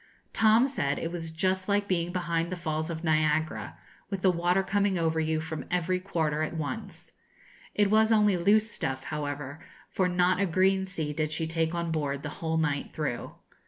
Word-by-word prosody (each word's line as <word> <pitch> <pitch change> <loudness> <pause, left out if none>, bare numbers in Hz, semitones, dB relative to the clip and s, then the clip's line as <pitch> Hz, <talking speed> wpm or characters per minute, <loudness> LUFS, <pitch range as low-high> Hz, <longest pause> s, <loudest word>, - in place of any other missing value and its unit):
Tom 225 +3 +5
said 145 - -1
it 165 - -3
was 165 -2 -5
just 185 +3 0
like 200 0 +2
being 175 -2 0
behind 170 -1 -1
the - - -1
falls 160 -2 -2
of 165 0 -5
Niagara, 155 -1 0 0.3
with 195 -2 -4
the 190 - +6
water 175 +2 +1
coming 200 -1 +1
over 160 -1 +1
you 160 0 0
from 160 0 -5
every 180 +1 0
quarter 160 -5 -1
at 155 +2 -2
once. 145 -4 -5 0.6
It 205 -1 +3
was 220 +1 +4
only 210 -3 +4
loose 210 +5 +3
stuff, 130 -1 -3
however, 145 -1 -4 0.3
for 185 -1 +1
not 180 +1 +2
a 200 - +2
green 190 +2 +2
sea 160 -5 -3
did 155 0 -1
she 160 +1 -1
take 160 +1 -1
on 170 -1 -2
board 140 -3 -2
the 150 - -3
whole 160 -1 0
night 145 -3 -1
through. 145 -6 -3
170 Hz, 190 wpm, -28 LUFS, 155-190 Hz, 0.6 s, the